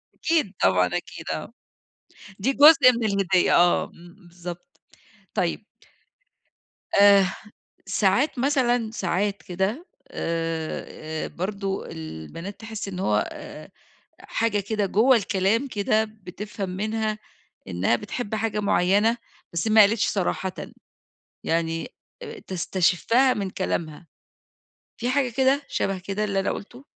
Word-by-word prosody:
أكيد 305 - 0
طبعًا، 90 -1 +4
أكيد 90 - -5
آه. - - -6 0.9
دي 235 +8 +1
جزء 285 -2 +8
من 235 -1 -2
الهدية 195 -3 +2
آه، 175 0 +4
امم، 175 +1 -15
بالضبط 175 +9 -10 0.5
طيب - - -1 1.3
آآ، 200 -1 +7 0.6
ساعات 205 +8 +1
مثلًا 245 -4 +1
ساعات 200 0 -1
كده 190 - -2 0.2
آآ، 160 -1 -4
أ - - -7
برضه 195 +1 -4
البنات 80 - -8
تحس 220 -2 -6
إن 185 -2 -6
هو 105 - +1
آآ، - - -10 0.5
حاجة 225 -2 0
كده 205 +1 -1
جوّه 225 +7 +4
الكلام 200 +4 +1
كده 215 -2 +1
بتفهم 210 -1 -7
منها 215 +3 -2 0.5
إنّها 95 +4 +1
بتحب 210 - -4
حاجة 215 -1 -1
مُعينة، 205 +3 +2 0.4
بس 170 +6 -1
ما 220 0 +7
قالتش 210 +1 +3
صراحةً، 190 -1 -1 0.9
يعني 165 +5 -1 0.3
آآ 450 -2 -8
تستشفّها 190 - +2
من 200 -4 -3
كلامها. 170 -3 -4 0.9
في 240 - -3
حاجة 270 -1 +2
كده 265 +4 +2
شبه 195 -1 -1
كده 195 +3 -3
اللي 200 -2 0
أنا 195 - -1
قُلته؟ 245 +6 -9
200 Hz, 120 wpm, -24 LUFS, 180-230 Hz, 1.3 s, جزء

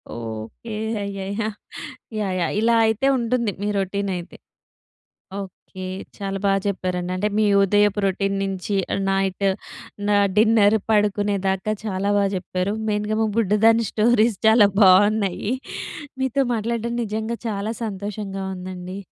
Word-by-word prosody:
Okay. 115 - -7 0.3
అయ్యయ్యా! 200 +2 -3 0.7
Yeah! 195 -3 -1
Yeah! - - -1
ఇలా 230 +1 +3
అయితే 220 +5 +1
ఉంటుంది 235 -2 0
మీ 205 - -1
రౌటీన్ 200 +1 -1
అయితే. 175 0 -9 1.0
ఓకే. 185 -1 -9 0.3
చాలా 195 -1 -3
బాగా 195 0 +3
చెప్పారండి. 180 -2 -2
అంటే 205 +3 0
మీ 215 - +4 0.2
ఉదయపు 205 +1 +3
రొటీన్ 195 +1 0
నుంచి 195 +1 -2 0.3
నైట్ 195 0 0 0.6
నా 205 - +4 0.2
డిన్నర్ 220 -1 +5
పడుకునే 205 -1 +2
దాకా 190 +3 0
చాలా 200 -1 -1
బాగా 200 -1 +2
చెప్పారు. 185 +2 -2 0.2
మెయిన్‌గా 210 +1 -1
మా - - +2
బుడ్డదాని 225 +1 +3
స్టోరీస్ 225 -1 +3
చాలా 220 -2 +6
బాగున్నాయి. 200 +2 +4 0.7
మీతో 265 +1 +1
మాట్లాడడం 235 +1 -2
నిజంగా 220 +2 -3
చాలా 210 +1 -2
సంతోషంగా 200 -1 -4
ఉందండి. 185 +1 -7
205 Hz, 120 wpm, -22 LUFS, 195-220 Hz, 1.0 s, చాలా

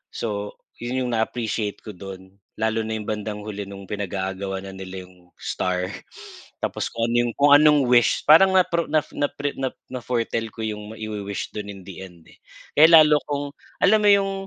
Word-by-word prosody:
So, 105 -2 -4 0.2
yun 125 +2 -2
yung 125 - -2
na-appreciate 110 -2 -2
ko 110 - -7
dun, 95 0 -11 0.2
lalo 110 0 0
na 110 - -2
yung 105 - -7
bandang 105 -1 -4
huli 105 -2 -6
nung 100 0 -9
pinag-aagawan 95 -1 -4
na 95 - -7
nila 95 -1 -8
yung 90 -1 -22
star. 90 0 -2 0.7
Tapos - - -2
kung 115 0 -2
ano - - 0
yung 120 - -4
kung 145 0 +4
anong 150 -2 +5
wish, 120 -3 +4
parang 190 +5 +7
natro 170 -2 +2
naf 155 -1 0
napre 145 0 -2
na 135 - 0 0.2
na-foretell 115 -2 -2
ko 115 - -6
yung 105 0 -5
maiwi-wish 105 -3 -5
dun 105 -1 -5
in 100 -2 -11
the 95 -2 -9
end 85 -3 -16
eh. - - -20 0.4
Kaya 155 +2 +8
lalo 150 -1 +4
akong, 145 0 -3 0.4
alam 215 - +5
mo 205 - +5
yung 200 -1 +3
110 Hz, 185 wpm, -23 LUFS, 100-135 Hz, 0.7 s, Kaya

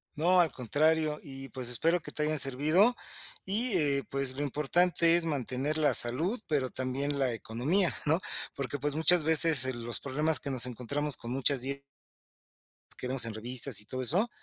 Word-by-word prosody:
No, 180 +4 0
al 165 -4 -2
contrario, 150 +5 -3
y, 135 -1 -12
pues, 130 -2 -3
espero 165 +9 -1
que - - -10
te 150 - -5
hayan 155 0 -2
servido 155 - 0 0.5
y, 225 +6 -4
eh, 140 -4 -2
pues 135 -1 +2
lo 145 - -4
importante 165 +4 -1
es 170 -1 -1
mantener 140 0 -5
la 155 -2 -1
salud, 160 - +2
pero 140 -5 -3
también 135 +3 -6
la 135 -2 -2
economía, 140 - -3
¿no? 160 +3 -1 0.3
Porque, 140 +1 -7
pues, 145 +1 -4
muchas 160 +1 +4
veces, 160 -3 +8
eh, 130 - -3
los 120 0 -4
problemas 150 +3 +2
que 140 - -6
nos 130 -2 +5
encontramos 125 +4 -3
con 120 - -11
muchas 135 0 +1
die. 140 +1 -5 1.2
Que - - -7
vemos 130 -2 +3
en 115 - -7
revistas 120 +1 +3
y 105 - -10
todo 130 +4 -7
eso, 180 - +4
140 Hz, 185 wpm, -26 LUFS, 130-160 Hz, 1.2 s, veces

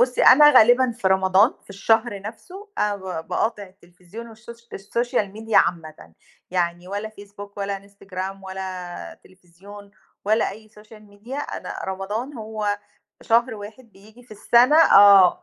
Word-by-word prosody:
بُصّي 250 0 +1
أنا 295 +3 +8
غالبًا 250 0 +5
في 225 -5 -2
رمضان 190 +4 +3
في - - -18
الشهر 220 +1 0
نَفْسه 355 - -11
أنا 210 -1 0
ب - - -16 0.3
باقاطع 220 -2 -2
التليفزيون 185 +3 -13
والشوش 230 +1 -14
الSocial 215 0 -3
Media 225 0 -6
عامةً، 155 - 0 0.4
يعني 175 0 -2
ولا 205 +2 -5
Facebook 205 -1 -13
ولا 200 0 -5
Instagram 195 -1 -7
ولا 185 -2 -7
تليفزيون 190 +3 -16 0.3
ولا 215 +2 +1
أي 215 +2 -13
Social 215 0 -17
Media، 240 +8 -7
أنا - - -7
رمضان 205 +8 -5
هو 215 -3 -4 0.4
شهر 235 +1 +1
واحد 220 +3 -12
بييجي 215 +5 -19
في 245 - -26
السَنة 240 +6 +3
آه، 200 - +6
205 Hz, 140 wpm, -22 LUFS, 190-230 Hz, 0.4 s, أنا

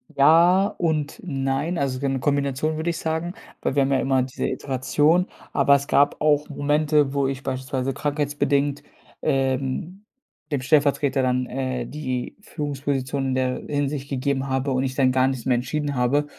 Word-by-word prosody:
Ja 170 +7 +6
und 155 -3 -1
nein, 135 +2 -1
also, 135 -3 -1
so 140 - -3
eine 135 -1 -1
Kombination 140 +2 0
würde 160 +2 -1
ich 170 - -2
sagen, 165 +3 -3 0.3
weil - - -1
wir 140 - +4
haben 135 - 0
ja 135 - +3
immer 130 -1 +2
diese 130 - -3
Iteration. 145 +6 +1 0.3
Aber 140 0 +5
es 140 0 -1
gab 145 - +3
auch 150 0 +2
Momente, 145 0 +1
wo 140 -1 +1
ich 135 0 -4
beispielsweise 130 0 -2
krankheitsbedingt, 145 -1 0 0.4
ähm, 135 +8 -1 0.5
dem 140 -3 0
Stellvertreter 140 -1 +2
dann, 125 0 +1
äh, 130 -1 -3
die 130 -4 -4
Führungsposition 140 -4 -3
in 130 - 0
der 130 -1 0
Hinsicht 145 -1 -2
gegeben 135 0 -1
habe 135 +1 0
und 130 0 +1
ich 130 -1 -3
dann 130 -2 +3
gar 130 0 +3
nichts 130 -3 -3
mehr 130 - +3
entschieden 145 +4 -2
habe. 130 +4 +1
140 Hz, 170 wpm, -23 LUFS, 130-150 Hz, 0.5 s, Ja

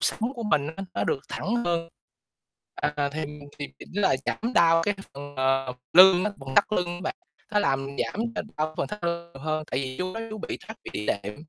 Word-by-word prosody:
sống 230 +4 +1
của 235 - -5
mình 150 -9 +2
á, 195 - -4
nó - - +1
được 135 - 0
thẳng 225 +5 -1
hơn." 170 -1 0 0.9
À, 150 -1 0
thì 155 0 -2 0.3
thì 145 - -4
chỉnh - - -12
lại, 190 -10 +3
giảm 235 +3 -1
đau 165 -1 +6
cái 205 +3 +1 0.2
phần, 145 0 -8
ờ, 130 -1 +2 0.2
lưng 185 +1 +9
á, 210 - +1
phần 135 0 -6
thắt - - +8
lưng 180 -3 +2
á 175 - -7
bạn, - - -2 0.4
nó 210 - +4
làm 135 -5 +1
giảm 210 - -1 0.4
đau 155 +1 -1
phần - - +1
thắt 210 -4 -6
lưng 170 0 -2
nhiều 135 - -10
hơn, 155 0 -1
tại 130 - +1
vì 130 -1 -4
chú 185 0 -2
nói 225 - -3
chú 215 - -5
bị - - -4
thoát 220 0 -7
vị - - -6
đĩa 105 - -3
đệm. 100 +1 -1
165 Hz, 230 wpm, -27 LUFS, 140-195 Hz, 0.9 s, lưng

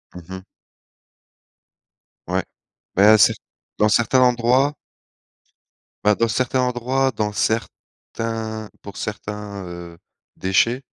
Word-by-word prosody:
Mmh 90 - -8
mh. 95 0 -6 1.9
Ouais, 95 +2 0 0.5
beh, 105 +3 +7
c'est 105 - +5 0.4
dans 105 0 +3
certains 120 +4 +3
endroits 125 +3 +3 1.3
bah, 105 0 +4
dans 115 - +1
certains 130 +3 0
endroits, 125 +2 0
dans 105 -1 -1
certains 110 0 -3
pour 100 -1 -10
certains, 105 -2 -5
heu, 85 -1 -9 0.4
déchets, 115 +7 +1
110 Hz, 100 wpm, -21 LUFS, 100-120 Hz, 1.9 s, beh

